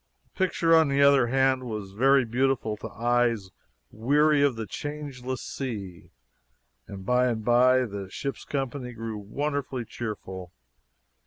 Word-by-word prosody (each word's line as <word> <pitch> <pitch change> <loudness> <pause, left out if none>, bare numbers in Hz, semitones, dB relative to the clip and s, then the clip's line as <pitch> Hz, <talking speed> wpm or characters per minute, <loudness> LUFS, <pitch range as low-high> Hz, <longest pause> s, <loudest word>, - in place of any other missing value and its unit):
The - - -30
picture 165 -2 +3
on 160 -1 +5
the 140 0 +3
other 140 -3 +5
hand 130 0 +2
was 105 -4 -5
very 135 +5 +4
beautiful 120 -2 0
to - - -7
eyes 120 -4 0 0.4
weary 145 +6 +3
of 140 -3 +3
the 115 -1 -4
changeless 135 0 -6
sea, 100 -10 -6 0.8
and 95 -1 -9
by 125 +2 +3
and 110 -3 -2
by 125 +1 +4
the 100 -3 -6
ship's 140 +4 -5
company 135 -2 -4
grew 115 -2 -5
wonderfully 135 +3 -3
cheerful. 95 -6 -7
125 Hz, 140 wpm, -26 LUFS, 110-135 Hz, 0.8 s, on